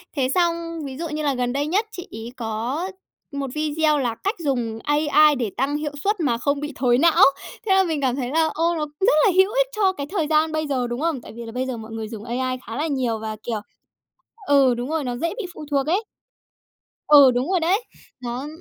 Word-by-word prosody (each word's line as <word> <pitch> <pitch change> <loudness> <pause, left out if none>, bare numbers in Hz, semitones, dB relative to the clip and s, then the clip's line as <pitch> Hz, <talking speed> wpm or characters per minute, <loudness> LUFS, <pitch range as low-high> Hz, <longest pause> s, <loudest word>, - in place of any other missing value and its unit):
Thế 260 -2 +1
xong 335 -2 0
ví 265 -1 -7
dụ 330 0 -4
như 305 0 -3
là 285 - +1
gần 250 -1 -1
đây 285 +2 -1
nhất 400 +7 +1
chị 360 -5 -8
ấy 225 +2 -7
có 235 - -3 0.4
một 280 -1 -3
video 305 0 +1
là 240 -4 -1
cách 400 +4 0
dùng 240 -7 -2
AI 300 0 +4
để 240 -5 -2
tăng 275 +3 0
hiệu 300 -1 -3
suất 415 0 +1
mà 250 -8 +1
không 280 +3 0
bị 295 -1 -5
thối 245 -2 +3
não, 330 +4 +5 0.4
thế 385 - +3
là 385 - +5
mình 320 -5 -2
cảm 255 -2 +1
thấy 255 -3 -3
là, 320 +2 +2
ô, 335 +2 +1
nó 310 -2 -1
rất 400 +5 +4
là 400 - +5
hữu 380 +2 +5
ích - - +3
cho 390 -3 +2
cái 280 -5 -5
thời 340 -7 -1
gian 315 +1 +2
bây 310 -1 -1
giờ, 255 -3 -1
đúng 240 +4 -4
không? 320 -6 -1
Tại - - -11
vì 235 0 -7
là 225 - -7
bây 255 +2 -2
giờ 255 -2 -4
mọi 220 0 -9
người 225 -1 -5
dùng 215 -1 -8
AI 255 +2 -2
khá 225 - -5
là 310 +3 0
nhiều 250 -6 -1
và, 220 0 -4
kiểu 225 -3 -2 0.9
ừ, 275 -3 +5
đúng 245 +3 -4
rồi, 320 -1 -1
nó 245 -2 -3
dễ 335 +5 -1
bị 425 - -3
phụ 305 - -9
thuộc 280 0 +1
ấy. 380 +7 +1 1.1
Ừ, 285 -3 +9
đúng 255 +7 -1
rồi 370 -2 +2
đấy. 380 +8 +1 0.4
Nó 245 +3 -4
285 Hz, 240 wpm, -23 LUFS, 245-325 Hz, 1.1 s, Ừ